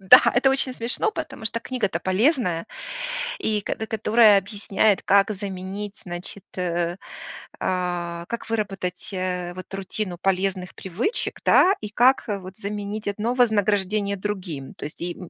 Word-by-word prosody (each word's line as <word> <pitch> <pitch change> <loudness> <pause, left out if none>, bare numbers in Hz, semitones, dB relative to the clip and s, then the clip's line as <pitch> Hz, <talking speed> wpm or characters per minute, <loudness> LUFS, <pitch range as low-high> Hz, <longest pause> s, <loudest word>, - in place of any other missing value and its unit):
Да, 195 +7 +9
это 270 +2 +5
очень 265 -1 +1
смешно, 245 - 0
потому 225 - -6
что 230 +2 -2
книга-то 230 -5 -2
полезная, 185 - +1 0.7
и 215 -1 0
кото 220 - -3
которая 220 -1 +5
объясняет, 200 +1 +1
как 200 +2 +4
заменить, 200 +1 -5
значит, 180 +2 -7
э, 175 -1 0 0.6
а, 175 -2 -2
как 235 -1 -5
выработать, 195 -5 -2
э, 180 -1 -2
вот 185 +1 -9
рутину 195 -1 -3
полезных 190 -1 0
привычек, 200 - -2
да, 380 +2 +6
и 210 - -4
как, 245 +5 +4
э, 200 - -1
вот 185 +1 -10
заменить 205 +1 -4
одно 215 +4 -1
вознаграждение 205 -3 +2
другим. 185 -9 -4
То - - -9
есть 150 - -8
и, 175 0 -3
м, 180 - -9
200 Hz, 145 wpm, -24 LUFS, 185-220 Hz, 0.7 s, Да